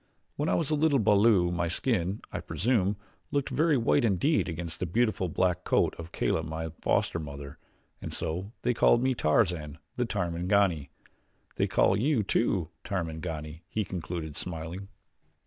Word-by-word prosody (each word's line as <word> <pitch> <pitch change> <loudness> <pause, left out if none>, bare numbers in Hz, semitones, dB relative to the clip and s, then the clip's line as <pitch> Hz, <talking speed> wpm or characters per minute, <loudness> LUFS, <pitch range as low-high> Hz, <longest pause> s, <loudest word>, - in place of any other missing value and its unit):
When 150 +2 -1
I - - +3
was 155 -3 0
a - - +3
little 150 -1 +3
balu 105 -4 +4
my 85 0 0
skin, 95 +1 -1
I - - -3
presume, 105 -2 +1 0.3
looked 140 -1 -1
very 155 -1 +3
white 125 +3 +3
indeed 115 - +2
against 85 -1 -5
the 90 - -1
beautiful, 110 -1 +1
black 90 +2 +1
coat - - +2
of 85 0 -8
Kala, - - 0
my 80 0 -4
foster 85 - +1
mother 70 -2 -8 0.4
and - - -5
so 90 +6 -4
they 125 - +2
called 120 +1 +4
me 130 0 +2
Tarzan, 75 - +1 0.2
the 125 - +1
Tarmangani. 90 - +1 0.7
They - - +2
call - - +3
you, 120 +2 +2
too, 95 -5 +1
Tarmangani," 80 -3 -4
he 110 0 -1
concluded, 85 -4 -5
smiling. 85 +4 -5
90 Hz, 155 wpm, -29 LUFS, 80-115 Hz, 0.7 s, balu